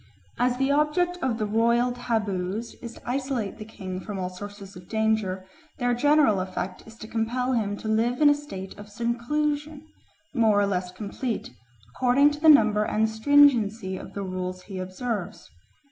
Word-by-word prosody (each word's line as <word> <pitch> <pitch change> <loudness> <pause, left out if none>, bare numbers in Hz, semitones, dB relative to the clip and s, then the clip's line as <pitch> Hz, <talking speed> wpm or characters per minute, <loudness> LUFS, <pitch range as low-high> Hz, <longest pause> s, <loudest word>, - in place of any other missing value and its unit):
As 250 0 +2
the 270 +1 +1
object 305 +5 +1
of 250 -6 0
the 215 - -1
royal 235 +3 +2
taboos 215 -3 -2
is 235 -1 -7
to - - -14
isolate 250 -5 -2
the 215 - -7
king 185 -4 -6
from 205 +1 -6
all 185 -1 -3
sources 200 +1 -9
of 180 0 -13
danger, 220 -4 0 0.3
their 245 -3 +1
general 285 -4 +4
effect 185 0 -4
is 220 - -12
to 220 - -10
compel 240 +3 -1
him 205 -4 -1
to 220 - -7
live 230 +3 +1
in 300 - +6
a 290 - +7
state 240 -11 -7
of 205 0 -10
seclusion, 290 +7 -2 0.5
more 220 -5 +3
or 205 - +3
less 180 -2 -2
complete, 210 +5 -4 0.4
according 260 - +4
to 295 - -6
the 315 +1 +5
number 215 -7 +6
and 215 +1 +1
stringency 220 -5 +4
of - - -9
the 200 - -3
rules 185 -1 -4
he 195 -2 -7
observes. 185 +1 -5
225 Hz, 175 wpm, -26 LUFS, 200-255 Hz, 0.5 s, a